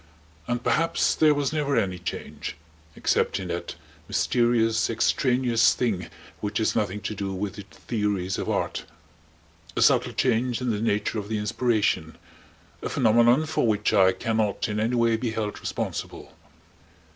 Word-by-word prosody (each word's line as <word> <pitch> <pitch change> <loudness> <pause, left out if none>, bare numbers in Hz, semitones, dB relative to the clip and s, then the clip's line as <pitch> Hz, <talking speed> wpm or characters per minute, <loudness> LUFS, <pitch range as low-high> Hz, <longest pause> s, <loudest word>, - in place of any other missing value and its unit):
And 120 0 -2
perhaps 165 +1 +2
there 155 -1 +4
was 145 +1 -1
never 145 -2 0
any 95 -5 0
change, 90 - -6 0.4
except - - +1
in - - -6
that - - -4 0.3
mysterious, 115 -2 +2
extraneous 120 0 +2
thing 100 -8 -1 0.3
which 105 0 -3
has 110 - +1
nothing 105 0 -1
to 105 - -3
do 100 -1 -4
with 100 +1 -3
the 100 - -9
theories 100 +1 -2
of - - -3
art; - - -2 0.9
a - - 0
subtle - - +3
change 120 +1 +1
in 125 -2 -1
the 105 -1 -2
nature 105 0 0
of 105 0 -7
the 110 - -1
inspiration; 105 -6 0 0.6
a - - -3
phenomenon 120 +5 +4
for 155 -6 0
which 105 -1 +1
I 95 -1 +6
can 115 +3 -2
not 105 -3 0
in 105 0 -2
any 115 +3 0
way 115 -1 +3
be 115 +1 -2
held 110 -2 -3
responsible. - - -5
110 Hz, 155 wpm, -25 LUFS, 105-120 Hz, 0.9 s, I